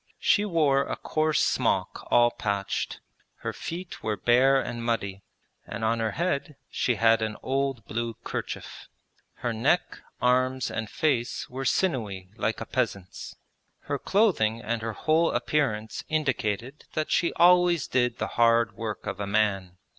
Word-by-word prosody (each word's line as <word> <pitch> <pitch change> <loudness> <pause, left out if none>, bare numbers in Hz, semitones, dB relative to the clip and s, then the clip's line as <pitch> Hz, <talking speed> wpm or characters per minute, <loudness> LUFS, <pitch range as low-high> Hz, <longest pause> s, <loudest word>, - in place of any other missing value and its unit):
She 205 - +3
wore 155 -8 +3
a - - -2
coarse 155 0 +1
smock - - 0
all 120 0 +5
patched; 100 -3 -2 0.4
her - - -3
feet 175 +2 -6
were 105 -1 -2
bare 130 +3 +4
and 120 -2 -4
muddy, 100 -5 -2 0.5
and 115 - -5
on 115 +1 +1
her 110 -2 -1
head 150 -3 -1 0.2
she 125 - +1
had 115 +1 +4
an 110 -1 -2
old 135 -4 -1
blue 115 +1 -3
kerchief. - - -6 0.6
Her 120 - +1
neck, 135 +11 +1 0.2
arms, 130 +1 +2
and 110 -2 -4
face 135 -7 0
were 135 +1 -4
sinewy 105 - -1
like 110 -1 -1
a 115 - -5
peasant's. 100 -7 -3 0.5
Her 145 -1 -3
clothing 170 - +2
and 115 +1 -2
her 115 0 -3
whole 160 +7 +2
appearance 120 -4 -1
indicated 135 -4 -1
that 155 0 -2
she 170 - +2
always 175 -3 +5
did 125 -2 +1
the - - -1 0.2
hard 115 -1 +4
work 110 -2 -5
of 95 - -4
a 100 - -3
man. 100 -3 0
120 Hz, 150 wpm, -27 LUFS, 110-145 Hz, 0.6 s, all